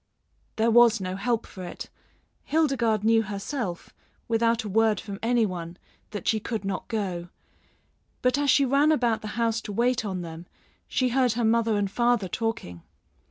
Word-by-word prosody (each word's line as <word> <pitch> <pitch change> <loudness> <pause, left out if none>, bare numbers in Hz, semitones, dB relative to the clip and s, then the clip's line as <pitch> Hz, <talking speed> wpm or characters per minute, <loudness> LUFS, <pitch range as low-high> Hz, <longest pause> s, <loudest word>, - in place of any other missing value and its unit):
There 225 +1 +2
was 235 -1 +6
no 185 -1 -4
help 230 +3 -1
for 185 - -10
it. 175 - -8 0.5
Hildegarde 255 -9 +1
knew 225 0 +4
herself, 200 -1 -5 0.3
without 230 0 +1
a - - -5
word 220 +1 +2
from 200 -2 -7
any 235 0 +2
one, 175 -3 -6 0.3
that 210 -1 -6
she 220 - +2
could 215 -1 -4
not 195 -1 -3
go; 185 -6 -3 0.9
but 250 +1 +3
as 290 -1 +1
she 275 +1 +5
ran 280 +4 +3
about 240 -7 +1
the 215 - -6
house 230 -1 +1
to 210 - -7
wait 240 +3 +1
on 190 -4 -3
them, 165 +1 -9 0.4
she 255 -1 +1
heard 250 -1 +2
her 235 0 0
mother 225 -1 +2
and 200 -1 -1
father 240 -2 +2
talking. 175 - -4
225 Hz, 170 wpm, -26 LUFS, 195-240 Hz, 0.9 s, was